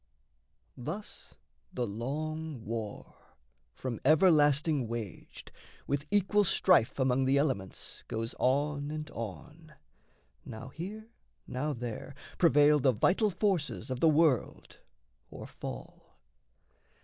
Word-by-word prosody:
Thus 160 - -7 0.4
the 125 - -2
long 145 +5 -4
war, 110 -2 -6 0.6
from 125 -4 -4
everlasting 150 -3 +4
waged, 110 -6 -7 0.3
With 140 +1 -2
equal 205 +1 +3
strife 180 - +3
among 130 -1 +2
the 135 +1 +3
elements 130 -10 -2
Goes 115 +2 -3
on 145 +2 +1
and 155 0 -5
on. 150 - -8 0.7
Now 110 +3 -8
here, 210 - -8 0.3
now 145 +4 -2
there, 120 +2 -6 0.2
prevail 150 -3 +5
The 130 -1 +3
vital 195 - +2
forces 170 - -1
of 130 - -2
the 165 - +5
world 155 -4 +1 0.5
or - - -9
fall. - - -9
145 Hz, 105 wpm, -31 LUFS, 125-160 Hz, 0.7 s, prevail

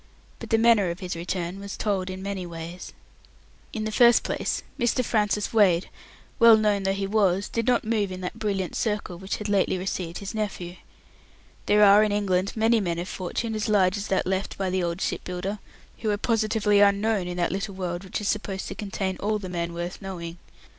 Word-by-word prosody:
But - - -8
the 225 - +4
manner 225 -5 +4
of 170 +1 -5
his 180 -2 -4
return 175 +2 -3
was 200 0 -7
told 195 -3 -1
in 185 0 -6
many 200 -2 -3
ways. 170 +1 -8 0.8
In 220 - -4
the 215 - -2
first 235 +1 +6
place, - - -2 0.2
Mr. 240 +1 +1
Francis 210 -1 0
Wade, 190 -6 +4 0.5
well 230 -2 +8
known 210 -2 +2
though 195 0 +1
he 195 0 -2
was, 195 -1 +2
did 230 0 -2
not 245 -1 +3
move 215 -3 0
in 185 0 -6
that 180 - -5
brilliant 195 -4 -2
circle 210 -5 -2
which 190 +1 -3
had 210 - -5
lately 200 -2 +2
received 180 -2 -3
his 200 +1 -6
nephew. 185 -5 -4 0.9
There 210 0 +5
are 205 +1 +7
in 210 - +1
England 195 -2 0
many 225 +1 +3
men 175 -4 -1
of 175 +1 -4
fortune, 210 +6 -3
as 215 +1 -2
large 190 -3 +3
as 205 0 -4
that 190 - +1
left 190 +1 -2
by 190 -2 -1
the 185 0 0
old 170 +1 -2
ship - - -2
builder, 185 +3 -4 0.4
who 220 - -1
are 205 - +1
positively 215 -2 +2
unknown 200 -1 +3
in 180 0 -5
that 175 - 0
little 195 +1 -3
world 180 -1 -4
which 190 - -4
is 210 - -3
supposed 200 -3 -2
to - - -4
contain 195 -2 -3
all 215 +1 0
the 190 -3 -7
men 170 -1 -3
worth 175 +3 -5
knowing. 175 -3 -6
195 Hz, 210 wpm, -25 LUFS, 185-215 Hz, 0.9 s, well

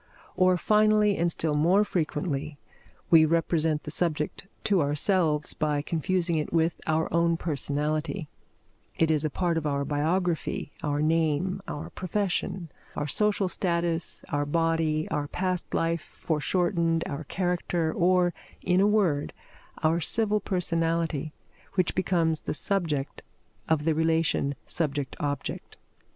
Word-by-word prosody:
Or, 185 0 +4
finally 210 +1 +3
and 170 -1 +1
still 160 -1 -1
more 175 +8 +4
frequently, 150 -5 -2 0.5
we 165 -2 +8
represent 160 -1 +1
the 150 - -4
subject 160 +2 -1 0.2
to 200 -5 +3
ourselves 150 +1 +1
by 150 -2 -1
confusing 170 +1 0
it 150 - -2
with 165 0 +1
our 160 0 +1
own 170 0 +3
personality; 155 +2 -2 0.7
it 160 -1 +3
is 155 -1 +1
a 155 - 0
part 170 +2 0
of 155 - -3
our 140 -1 -1
biography, 160 +2 -1
our 145 -1 0
name, 165 +4 +1
our 145 - -6
profession, 185 -3 -2 0.2
our 145 - -2
social 205 +5 +2
status, 170 -2 -1
our 145 0 0
body, 165 0 +1
our 150 -2 -1
past 185 +2 -2
life 165 -1 0
foreshortened, 165 +2 0
our 145 +2 -4
character, 175 -2 -1
or, 180 0 +3 0.3
in 185 0 +3
a 200 - +5
word, 190 -9 +1 0.5
our 165 +2 +2
civil 210 +3 +3
personality, 165 -5 -1 0.4
which 185 -3 +1
becomes 165 -4 +1
the - - -3
subject 160 -7 -1 0.5
of 155 -2 +1
the 165 - +3
relation 160 -3 +1
subject 145 -4 -1
object. 145 -2 -4
165 Hz, 130 wpm, -27 LUFS, 150-180 Hz, 0.7 s, we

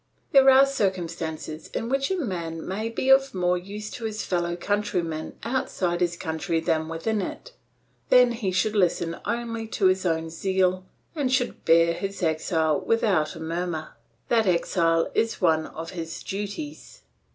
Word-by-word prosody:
There 270 -1 +7
are 265 +1 +8
circumstances 170 - -3
in 230 - -2
which 275 +2 0
a 380 - 0
man 170 - -4
may 215 +4 -2
be 260 +3 -2
of 270 -3 +4
more 180 -1 +2
use 205 +4 -6
to 235 - -6
his 215 0 -3
fellow 175 -1 -1
countrymen 175 -4 -2
outside 185 -8 -1
his 175 -1 +1
country 165 +1 -2
than 160 -1 0
within 200 +7 -1
it. - - -6 0.6
Then 250 -1 +6
he 225 -5 -2
should 210 +4 +1
listen 170 -3 +1
only 230 -1 -3
to 220 -2 -1
his 185 0 +3
own 165 -2 -1
zeal 185 +1 0 0.3
and 285 -6 -1
should 255 -1 0
bear 165 0 +5
his 195 +1 -5
exile 160 -1 +1
without 190 -10 +1
a - - -8
murmur; 165 -1 -3 0.3
that 225 -3 +2
exile 165 -1 +2
is 225 0 0
one 160 -4 +2
of 165 +1 -7
his 165 -3 -6
duties. 205 +10 -6
185 Hz, 160 wpm, -25 LUFS, 165-225 Hz, 0.6 s, are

